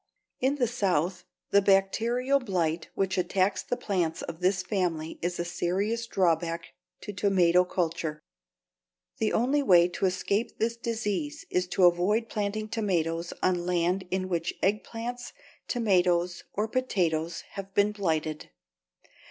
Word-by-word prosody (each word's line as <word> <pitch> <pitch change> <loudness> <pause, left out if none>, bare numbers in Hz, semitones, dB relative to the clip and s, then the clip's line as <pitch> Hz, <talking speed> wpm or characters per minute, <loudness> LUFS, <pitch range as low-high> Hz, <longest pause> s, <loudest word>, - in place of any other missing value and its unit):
In 265 +3 +2
the 260 -4 +2
South 185 -6 0 0.3
the 200 - +6
bacterial 230 +8 +2
blight 175 -8 -1
which 190 -1 0
attacks 185 +2 +1
the 245 - -3
plants 180 -9 -1
of 170 -1 -6
this 185 +1 +1
family 175 -5 -2
is 175 +1 -2
a 170 - -1
serious 195 +7 -1
drawback 170 -4 0 0.3
to 205 - -6
tomato 180 -3 +4
culture. 165 -4 -2 1.0
The 220 - +1
only 270 +5 +2
way 175 -9 +6
to 190 - 0
escape 200 +5 -1
this 230 +1 0
disease 235 +5 -3
is 180 0 +1
to 180 0 +3
avoid 195 +6 +3
planting 215 0 -2
tomatoes 175 -6 -1
on 180 -1 +1
land 180 +1 +1
in 185 0 -1
which 170 -2 -2
eggplants, 230 +4 -2 0.3
tomatoes, 180 -6 +1
or 210 +2 0
potatoes 170 -9 0
have 195 -1 -7
been 205 +1 +4
blighted. 160 -6 -2
190 Hz, 135 wpm, -28 LUFS, 175-215 Hz, 1.0 s, the